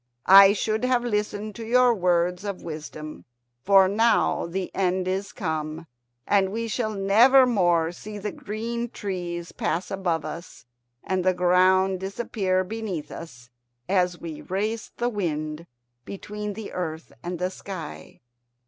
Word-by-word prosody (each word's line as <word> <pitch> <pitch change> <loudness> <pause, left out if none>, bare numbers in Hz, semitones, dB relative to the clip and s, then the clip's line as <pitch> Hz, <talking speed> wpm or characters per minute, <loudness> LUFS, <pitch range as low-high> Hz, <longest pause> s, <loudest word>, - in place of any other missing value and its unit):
"I 195 +1 +9
should 215 +2 -1
have 250 -1 +2
listened 210 -2 -2
to 230 - -6
your 245 +2 +4
words 180 -2 +1
of 200 -2 -5
wisdom, 155 -1 -8 0.4
for 195 +1 +6
now 225 -2 +2
the 185 +2 -4
end 185 -1 0
is 195 +2 -2
come, 160 -1 -4 0.4
and 195 -2 +2
we 230 +2 -3
shall 220 -1 -2
never 230 +7 +6
more 175 -8 +2
see 210 +4 -9
the 205 0 -4
green 235 +3 -4
trees 175 -5 -5
pass 175 +2 -2
above 175 -5 -1
us 170 -8 -8 0.4
and 185 -1 -1
the 185 0 +2
ground 185 +1 +3
disappear 190 -1 -1
beneath 200 -6 -5
us, 125 -7 -10 0.4
as 180 -2 +1
we 160 -3 -7
race 210 +4 -3
the 240 - 0
wind 160 -7 -3 0.4
between 210 +3 -6
the 220 +1 -7
earth 160 -3 -5
and 175 +3 -4
the 180 +2 -2
sky." 165 - -8
190 Hz, 140 wpm, -25 LUFS, 175-210 Hz, 0.4 s, I